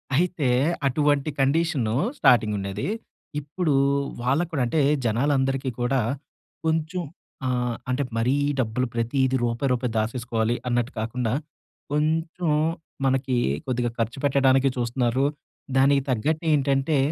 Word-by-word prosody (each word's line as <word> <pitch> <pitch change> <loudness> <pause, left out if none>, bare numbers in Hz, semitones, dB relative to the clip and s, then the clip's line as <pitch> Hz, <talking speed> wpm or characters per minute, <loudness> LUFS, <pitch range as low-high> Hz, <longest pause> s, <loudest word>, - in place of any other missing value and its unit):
అయితే 165 -4 +1 0.4
అటువంటి 145 +1 +1
కండిషను 135 -5 +1 0.2
స్టార్టింగుండేది. 105 - +2 0.5
ఇప్పుడు 150 +2 -1 0.5
వాళ్ళకి 145 +8 +1
కూడా 135 -5 0
అంటే 150 +6 +1 0.2
జనాలందరికీ 135 +2 +1
కూడా 125 +1 +2 0.6
కొంచెం 160 +3 0 0.5
ఆహ్, 125 -2 0
అంటే 130 +3 +1
మరీ 125 +4 +2 0.2
డబ్బులు 125 +2 0
ప్రతీది 130 +3 +1
రూపాయి 120 +3 0
రూపాయి 125 -1 0
దాచేసుకోవాలి 115 0 0
అన్నట్టు 120 0 0
కాకుండా, 115 +1 -1 0.6
కొంచుం 160 +2 0 0.5
మనకి 130 -1 +1 0.3
కొద్దిగా 125 -2 0
ఖర్చు 115 +4 -1
పెట్టడానికి 135 -1 +4
చూస్తున్నారు. 120 +2 +1 0.5
దానికి 140 +1 +5
తగ్గట్టేంటంటే, 145 +2 +1
130 Hz, 100 wpm, -25 LUFS, 120-145 Hz, 0.6 s, దానికి